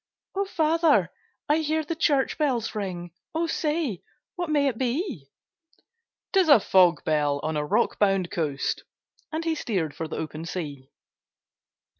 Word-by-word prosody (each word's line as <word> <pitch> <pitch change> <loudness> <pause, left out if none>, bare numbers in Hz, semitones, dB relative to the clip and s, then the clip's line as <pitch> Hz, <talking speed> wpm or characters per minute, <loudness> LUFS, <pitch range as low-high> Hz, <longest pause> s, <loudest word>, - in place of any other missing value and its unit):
'O 395 +1 0
father! 325 -3 +2 0.4
I 300 +1 +3
hear 315 0 0
the 310 - -3
church 290 -4 +1
bells 255 -7 0
ring, 180 -5 -4 0.2
O 330 +1 +1
say, 305 - -1 0.3
what 350 -2 -3
may 290 -2 +3
it 240 -5 -2
be?' 260 - -2 1.1
''Tis 380 -4 +4
a 285 - +9
fog 185 -3 +4
bell, 145 -2 +1
on 155 0 -1
a 150 - 0
rock 210 +10 +1
bound 195 -3 +2
coast!' 145 -5 -1 0.5
And 325 +1 -3
he 330 - +1
steer'd 185 - -2
for 165 - -4
the - - -5
open 155 +1 -5
sea. 145 -7 -6
230 Hz, 150 wpm, -26 LUFS, -, 1.1 s, a